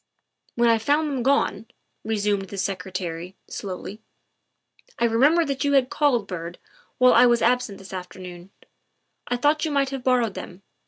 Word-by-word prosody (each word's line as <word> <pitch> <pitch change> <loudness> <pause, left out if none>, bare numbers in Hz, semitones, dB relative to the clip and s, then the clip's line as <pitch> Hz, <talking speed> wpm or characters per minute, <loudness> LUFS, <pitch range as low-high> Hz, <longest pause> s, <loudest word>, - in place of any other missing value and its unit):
" - - -42
When 235 0 +3
I 230 -1 +4
found 290 +7 +1
them 265 -3 -2
gone," 230 -5 +1 0.4
resumed 205 -3 -1
the 200 - -7
Secretary 180 -2 -4
slowly, 195 +2 -7 0.4
' - - -52
' - - -31
I - - +2
remembered 285 +9 +4
that 275 0 -2
you 285 0 +1
had 265 -2 +3
called, 265 -8 +2
Byrd, 175 -2 -6 0.4
while 255 0 +6
I 250 - +7
was 240 -1 +2
absent 240 -4 +1
this 190 0 -12
afternoon. 180 -1 -8 0.8
I 245 - -1
thought 295 +5 +2
you 320 - 0
might 280 -2 0
have 270 -2 -5
borrowed 245 -5 +2
them. 185 +1 -9
230 Hz, 175 wpm, -24 LUFS, 190-270 Hz, 0.8 s, I